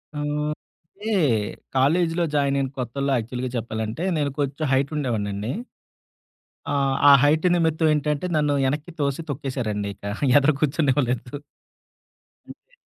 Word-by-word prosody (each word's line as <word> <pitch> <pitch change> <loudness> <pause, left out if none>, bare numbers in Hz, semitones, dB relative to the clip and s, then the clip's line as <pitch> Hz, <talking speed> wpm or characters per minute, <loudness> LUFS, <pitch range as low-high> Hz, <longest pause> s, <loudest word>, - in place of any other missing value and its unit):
ఆహ్, 150 0 -1 0.4
అంటే 210 +3 -7 0.7
కాలేజిలో 165 +5 +2
జాయిన్ 140 -1 +2
అయిన 135 -1 -1
కొత్తల్లో 135 +3 -2
యాక్చువల్‌గా 125 +2 -4
చెప్పాలంటే, 110 +5 -4
నేను 145 -2 0
కొంచెం 145 +2 -1
హైట్ 135 +2 +1
ఉండేవాడినండి. 105 -5 -2 1.1
ఆ! - - -4 0.4
ఆ - - +10
హైట్ 155 +3 +3
నిమిత్తం 160 -2 +2
ఏంటంటే 150 +2 -1
నన్ను 150 -1 +2
వెనక్కి 150 +5 -2
తోసి 140 +2 -1
తొక్కేేశారండిక 115 -8 -3 0.4
ఎదర 145 +1 +4
కూర్చొనివ్వలేదు. 135 -4 0 1.1
అంతే - - -16
140 Hz, 110 wpm, -23 LUFS, 125-150 Hz, 1.1 s, ఆ